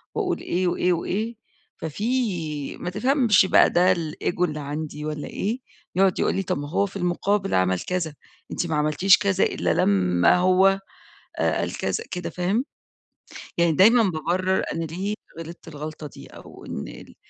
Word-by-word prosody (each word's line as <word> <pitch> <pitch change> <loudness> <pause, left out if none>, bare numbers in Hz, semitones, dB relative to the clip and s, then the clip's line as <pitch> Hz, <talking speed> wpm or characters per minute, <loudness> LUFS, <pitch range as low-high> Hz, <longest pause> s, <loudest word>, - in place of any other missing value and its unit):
وأقول 395 -5 -1
إيه 180 +1 -1
وإيه 180 +1 +1
وإيه، 215 +7 -2 0.4
ففي 170 - -2
ما 180 - -4
تفهمش 235 0 +3
بقى - - +5
ده 180 +2 +4
الEgo 170 +1 -3
اللي 155 -3 -1
عندي 150 +1 -5
والّا 150 -1 -4
إيه، 220 +6 -3 0.4
يقعد 190 0 +3
يقول - - +1
لي 195 - -1
طَب 160 - -2
هو 160 +7 0
في 200 - -10
المُقابل 195 +2 0
عمل 95 0 +2
كذا، 175 - -3 0.4
أنتِ 175 - -2
ما 160 - -1
عملتيش 155 +6 +4
كذا 195 -2 +1
إلا 85 -1 0
لمّا 90 - +3
هو 185 +2 +4 0.6
آآ - - +1
قال - - -3
كذا 455 - -2
كده 180 -1 -4
فاهم، 190 +8 0 0.9
يعني 170 -1 +3
دايمًا 225 +9 +6
بابرر 185 +1 0
أنا 165 - -2
ليه 190 +6 -3 0.2
غلطت 165 +1 -9
الغلطة 155 0 -7
دي، - - -13
أو - - -13
إن - - -5
ال - - -12
180 Hz, 160 wpm, -24 LUFS, 155-195 Hz, 0.9 s, دايمًا